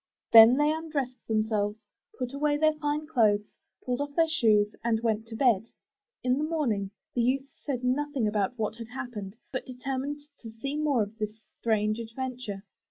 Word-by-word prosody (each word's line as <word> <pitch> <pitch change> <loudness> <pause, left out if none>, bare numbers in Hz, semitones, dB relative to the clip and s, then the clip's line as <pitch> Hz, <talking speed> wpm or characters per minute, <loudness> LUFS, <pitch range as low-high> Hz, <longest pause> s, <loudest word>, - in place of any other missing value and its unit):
Then 230 +3 +10
they 295 +1 +4
undressed 290 -6 -3
themselves, 215 -1 0 0.4
put 250 +1 -3
away 290 +1 +1
their 310 +1 +4
fine 300 0 -2
clothes, 215 -8 +2 0.3
pulled 250 +2 -1
off 285 0 -4
their 330 -1 +4
shoes 215 -10 +3
and 230 -1 +2
went 225 -1 0
to 225 - -7
bed. 230 -3 +3 0.5
In 255 +2 +2
the - - 0
morning 260 -12 0 0.2
the 245 - +1
youth 270 +3 0
said 255 -4 -3
nothing 265 -1 0
about 210 +2 0
what 220 0 -2
had 230 -1 -7
happened, 220 -6 -6 0.2
but 255 - -4
determined 270 +3 -4 0.2
to 225 - -9
see 250 +6 -5
more 295 -6 +2
of 210 +2 -9
this 215 0 -3 0.2
strange 215 -2 +1
adventure. 235 -3 -5
245 Hz, 170 wpm, -28 LUFS, 220-285 Hz, 0.5 s, Then